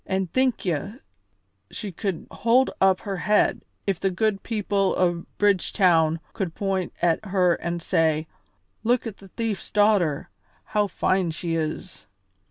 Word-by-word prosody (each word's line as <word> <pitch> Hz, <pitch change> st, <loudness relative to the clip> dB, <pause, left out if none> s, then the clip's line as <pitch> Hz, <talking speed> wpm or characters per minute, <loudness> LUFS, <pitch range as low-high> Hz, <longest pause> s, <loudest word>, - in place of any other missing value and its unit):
An' 190 Hz, 0 st, 0 dB
think 255 Hz, +6 st, 0 dB
ye 180 Hz, +5 st, -2 dB, 0.7 s
she 205 Hz, -3 st, -6 dB
could 185 Hz, 0 st, -3 dB
hold 245 Hz, +4 st, +3 dB
up 190 Hz, -1 st, +4 dB
her 195 Hz, -2 st, -4 dB
head 210 Hz, +3 st, +2 dB, 0.2 s
if 195 Hz, -4 st, 0 dB
the 195 Hz, -, +1 dB
good 195 Hz, +1 st, 0 dB
people 205 Hz, -3 st, 0 dB
o' 175 Hz, -2 st, +1 dB
Bridgetown 180 Hz, -5 st, +3 dB
could 180 Hz, -5 st, -3 dB
point 195 Hz, -2 st, -1 dB
at 170 Hz, +3 st, +2 dB
her 180 Hz, -3 st, +2 dB
an' 170 Hz, 0 st, -3 dB
say, 160 Hz, -1 st, +1 dB, 0.6 s
'Look 245 Hz, +2 st, +2 dB
at 220 Hz, -3 st, -6 dB
the 195 Hz, -, -14 dB
thief's 220 Hz, +1 st, -4 dB
daughter; 205 Hz, -8 st, +2 dB, 0.3 s
how 210 Hz, -1 st, 0 dB
fine 185 Hz, -2 st, +1 dB
she 165 Hz, +1 st, -3 dB
is!' 160 Hz, +3 st, -4 dB
190 Hz, 145 wpm, -24 LUFS, 170-205 Hz, 0.7 s, up